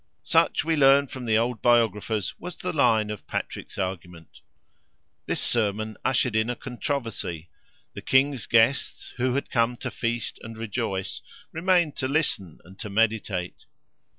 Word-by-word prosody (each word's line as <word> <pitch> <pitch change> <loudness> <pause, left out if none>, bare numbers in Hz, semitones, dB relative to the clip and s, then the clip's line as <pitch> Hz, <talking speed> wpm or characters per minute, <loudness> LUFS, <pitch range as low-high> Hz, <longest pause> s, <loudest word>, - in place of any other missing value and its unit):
Such, - - +2
we 165 0 +2
learn 140 -1 +6
from 130 -2 -8
the 110 -1 +3
old 120 0 0
biographers, 110 -4 +2
was 175 -2 -7
the 180 0 -3
line 110 -8 +3
of 105 - -8
Patrick's - - -5
argument. 90 -3 -6 0.9
This - - -1
sermon 110 -1 0
ushered 125 -3 +1
in 110 +1 +2
a 125 - -1
controversy. 115 - -4 0.4
The - - -7
king's 135 -1 +2
guests, 115 +4 +2
who 125 0 +1
had 140 - -2
come 120 0 +1
to - - -5
feast 120 0 -3
and 115 0 -9
rejoice, 110 -4 -3 0.3
remained 170 -2 +2
to 130 - -1
listen 130 - 0
and 95 +2 -16
to 105 - -5
meditate. 105 -4 -1
115 Hz, 150 wpm, -26 LUFS, 105-130 Hz, 0.9 s, learn